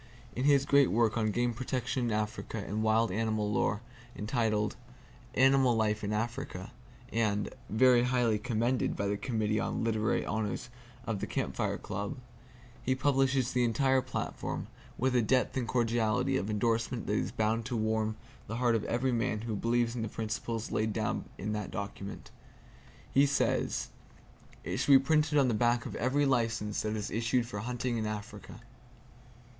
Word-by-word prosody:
In 125 - -1
his 140 -2 +5
great 140 -1 +5
work 110 +3 +2
on 110 -2 +1
game 120 +2 0
protection 125 +1 -2
in 115 - 0
Africa 110 +2 -2
and 105 +1 -3
wild 110 -1 +3
animal 110 0 0
lore, 105 +1 +1 0.3
entitled 110 -1 0 0.6
"Animal 130 -2 +5
Life 110 -1 +1
in 105 - -1
Africa" 115 -2 -3 0.4
(and 105 -2 0 0.2
"very 125 +2 +5
highly 120 -3 +2
commended" 120 +1 0
by 100 - -2
the 100 +1 0
Committee 110 -1 -1
on 115 - -2
Literary 110 0 +1
Honors 110 +2 -3 0.3
of 110 -3 -2
the - - -3
Camp - - -2
Fire - - -1
Club), 100 +9 -4 0.6
he 130 - +1
publishes 135 -2 +2
the 125 0 +2
entire 130 +3 +3
platform, 130 0 -4 0.3
with 130 0 +1
a 120 - +5
depth 125 +3 +1
and 125 -3 -1
cordiality 120 +2 +1
of 105 -5 -1
endorsement 115 +3 0
that 105 - -1
is - - 0
bound 110 +2 0
to 125 -2 -2
warm 110 0 0 0.3
the 115 - -4
heart 120 0 +2
of 115 - +1
every 125 +2 0
man 115 -2 0
who 115 -1 -3
believes 115 +2 +1
in 120 - -2
the 110 - -1
principles 115 +1 -3
laid 110 0 0
down - - -1
in 105 +2 -3
that 105 -2 -3
document. 100 0 -6 0.8
He 140 +1 +5
says, 140 0 0 0.7
"It - - -3
should 140 - +4
be - - +11
printed 150 +2 +2
on 140 -2 +5
the 120 - +1
back 120 +2 +2
of - - -5
every 135 +5 +2
license 115 -5 0
that 110 0 -2
is 105 -1 -4
issued 115 +2 +1
for 115 -4 -5
hunting 120 +1 -2
in 110 - -1
Africa." 105 +1 -7
115 Hz, 170 wpm, -31 LUFS, 110-125 Hz, 0.8 s, be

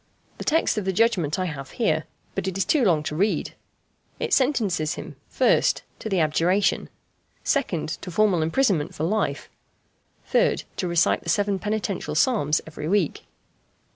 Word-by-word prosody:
The - - -4
text 320 -8 +2
of 200 - -5
the 190 - +1
judgment 185 -8 +2
I 185 - -1
have 140 -5 -6
here, 160 -9 +1 0.3
but - - -3
it 190 0 -2
is 195 - +1
too 270 +6 +2
long 165 -8 +3
to 150 - -4
read. 200 +6 0 0.7
It 465 -4 -1
sentences 210 - +1
him - - -8 0.2
1st. - - +3 0.2
To 220 - -5
the 190 -3 +1
abjuration. 170 +5 +1 0.6
2nd. 175 - -1
To 185 - -7
formal 185 -1 +2
imprisonment 165 - +1
for 155 - -3
life. 215 +6 -1 0.8
3rd. - - +2
To 185 - -1
recite 170 0 +2
the - - -6
seven 200 -2 +1
penitential 200 -5 -2
psalms 155 - +2
every 155 -1 -6
week. 185 -3 0
190 Hz, 160 wpm, -24 LUFS, 160-215 Hz, 0.8 s, long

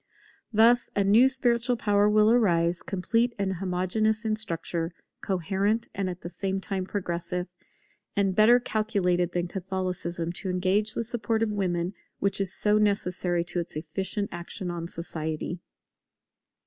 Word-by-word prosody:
Thus 235 +2 +5
a 200 - +3
new 220 +7 +6
spiritual 245 -2 +1
power 205 -1 +3
will 215 +1 +5
arise, 175 -7 +3
complete 230 +6 0
and 190 -2 -1
homogeneous 195 +5 0
in 215 -1 +1
structure, 170 -4 -3 0.3
coherent 195 +5 0
and 195 -2 -2
at 180 0 -7
the - - -6
same 190 +2 -2
time 190 -1 -3
progressive; 180 -2 -3 0.7
and 195 -2 +2
better 225 +4 +6
calculated 200 -7 0
than 175 0 -1
Catholicism 180 -2 -3
to 190 +1 -2
engage 190 +4 +1
the - - -1
support 225 -1 -1
of 220 - 0
women 180 -3 -1 0.2
which 200 0 0
is 190 -2 +1
so 210 +1 +2
necessary 180 -4 +1
to 175 +1 -3
its 170 - -5
efficient 190 +6 -2
action 175 +1 -5
on 170 -1 -4
society. 165 0 -4
195 Hz, 145 wpm, -27 LUFS, 175-215 Hz, 0.7 s, new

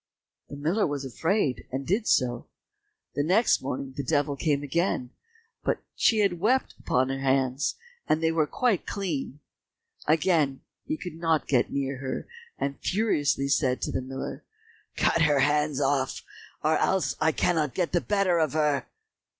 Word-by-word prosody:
The - - -7
miller 160 +9 +1
was 145 -2 -3
afraid, 155 - 0
and 135 +1 -3
did 210 - 0
so. 120 -1 +1 0.7
The - - 0
next 190 +10 +3
morning 135 0 -4
the 140 - -3
devil 145 +1 +1
came 145 0 0
again, 145 -4 -1 0.5
but - - -1
she 220 -2 +3
had 185 -4 +1
wept 250 +8 +2 0.2
on 130 +1 +3
her 135 0 -2
hands, 135 0 +1 0.3
and 155 - +3
they 160 0 +2
were 160 -2 +1
quite 230 +2 0
clean. 150 -7 -3 0.7
Again 155 -3 +2 0.3
he 310 +2 -1
could 180 - -7
not 165 -2 +1
get 125 -4 +2
near 140 -1 -2
her, 130 -1 -4 0.3
and 140 0 -3
furiously 145 -10 +1
said 130 -2 +2
to - - -1
the - - -1
miller, 130 +1 -6 0.5
"Cut 165 - +2
her 145 -3 +4
hands 150 0 +2
off, 135 -2 0 0.4
or 155 +1 +3
else 185 -9 +1
I 160 +1 +4
cannot 155 -4 0
get 180 -3 0
the 175 - +2
better 195 -4 +2
of 155 -3 +1
her." 150 -3 +1
150 Hz, 160 wpm, -27 LUFS, 135-170 Hz, 0.7 s, her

